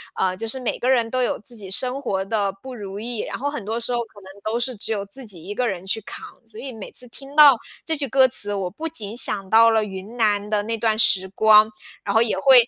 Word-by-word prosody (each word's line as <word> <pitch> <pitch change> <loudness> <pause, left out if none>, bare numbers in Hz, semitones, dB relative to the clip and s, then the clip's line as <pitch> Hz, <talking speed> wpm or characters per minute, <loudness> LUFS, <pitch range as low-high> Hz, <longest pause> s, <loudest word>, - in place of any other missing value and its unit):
呃， 185 -1 0
就 225 - -5
是 260 +4 -2
每 245 - -2
个 250 - -1
人 235 -3 +2
都 255 +1 -1
有 - - -1
自 240 +3 -8
己 195 -4 -8
生 255 +6 -1
活 195 -7 -2
的 200 -1 0
不 260 -1 -8
如 200 -2 -7
意。 235 0 -4
然 - - -5
后 285 +3 -1
很 285 -7 -6
多 220 +3 -3
时 235 +1 -1
候， 240 - 0
可 220 -2 -16
能 190 - -12
都 225 +2 -1
是 250 +1 -2
只 210 - -3
有 200 -2 -2
自 250 +6 -7
己 190 -7 -5
一 200 +5 -6
个 250 +2 0
人 190 0 -6
去 220 +3 -1
扛， 215 - -8 0.2
所 435 - -13
以 265 -3 -7
每 215 -3 -9
次 250 - -3
听 275 +3 -12
到 290 -4 +8 0.3
这 320 - -1
句 280 -2 -2
歌 265 -1 +5
词， 205 -5 +4
我 195 -3 -2
不 315 - -6
仅 220 -9 -3
想 200 -5 -1
到 230 +1 +6
了 220 -1 +2
云 195 +4 -8
南 210 -2 +1
的 210 -1 0
那 225 +2 -3
段 220 0 +1
时 190 -3 +4
光， 215 +2 +5 0.3
然 200 - -2
后 225 - +4
也 215 -5 +1
会 245 +2 +6
225 Hz, 295 characters per minute, -22 LUFS, 200-250 Hz, 0.3 s, 到